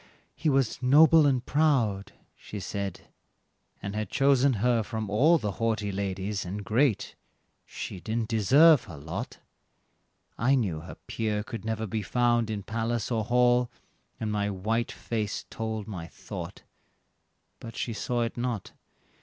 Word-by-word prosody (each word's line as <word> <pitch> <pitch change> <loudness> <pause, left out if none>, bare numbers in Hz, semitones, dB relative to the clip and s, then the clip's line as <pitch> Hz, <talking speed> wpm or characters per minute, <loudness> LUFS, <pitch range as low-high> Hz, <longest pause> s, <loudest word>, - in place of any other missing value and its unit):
"He 160 - -1
was 135 -4 +1
noble 150 +4 +6
and 130 -3 +1
proud," 125 -10 +1 0.2
she 105 - -8
said, 100 -1 -4 0.8
"and 100 - -4
had 105 -2 -2
chosen 135 -1 +3
her 115 +2 +2
from 110 -1 -4
all 150 +11 +5
The 105 -9 -2
haughty 110 -3 0
ladies, 100 +1 -2
and 100 +3 -5
great; 115 +2 +1 0.5
she 95 - -6
didn't 110 +3 -2
deserve 130 - +6
her 85 - -10
lot." 80 +3 -6 1.0
I 130 +5 +4
knew 100 -11 0
her 80 - -9
peer 105 -2 -2
could 115 -3 -7
never 110 0 -2
be 110 +1 -2
found 120 +1 +1
in 105 -2 -3
palace 115 +1 -2
or 110 -2 0
hall, 125 0 +3 0.5
And 110 -1 -2
my 105 -1 0
white 110 +5 -1
face 110 -3 -3
told 110 -2 -4
my 90 -6 -6
thought, - - -8 1.0
but 115 -1 -9
she 115 - -2
saw 120 +3 -1
it 115 - -3
not. 120 -4 -3
110 Hz, 145 wpm, -28 LUFS, 105-125 Hz, 1.0 s, noble